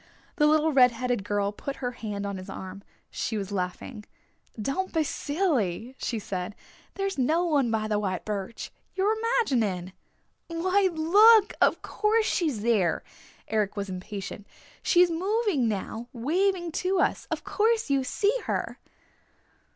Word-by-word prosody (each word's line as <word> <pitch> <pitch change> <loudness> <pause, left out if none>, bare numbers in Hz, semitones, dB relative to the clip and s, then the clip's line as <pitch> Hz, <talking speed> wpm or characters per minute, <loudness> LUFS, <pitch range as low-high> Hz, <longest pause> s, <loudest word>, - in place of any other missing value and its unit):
The 300 -2 +5
little 310 +1 +3
red 255 -2 +7
headed 245 -2 -2
girl 205 -1 0
put 275 +6 -6
her 250 -2 -3
hand 210 -4 -5
on 200 -1 -3
his 185 +1 -9
arm. 190 0 -7 0.3
She 220 - -2
was 200 -1 -4
laughing. 200 +4 -4 0.6
"Don't 275 - -2
be 320 -2 +2
silly," 275 - -1
she 235 - -2
said. 195 -1 -4 0.4
"There's 390 -5 -2
no 320 +7 +2
one 285 -7 +2
by 220 -1 0
the 210 -1 0
white 190 -3 -3
birch. 210 +1 -4 0.2
You're 405 +3 +2
imagining." 240 - 0 0.5
"Why, 370 +4 +2
look! 405 +7 +6
Of - - +3
course 435 +1 +1
she's 300 - 0
there!" 210 -8 +2 0.4
Eric 210 -1 -1
was 200 -1 -3
impatient. 195 +2 -6 0.3
"She's 355 -1 +4
moving 380 - +1
now, 220 +3 -3
waving 345 +8 0
to 370 0 +1
us. - - 0
Of - - -3
course 440 -3 +1
you 275 -1 +2
see 410 - +1
her!" - - -2
255 Hz, 145 wpm, -27 LUFS, -, 0.6 s, red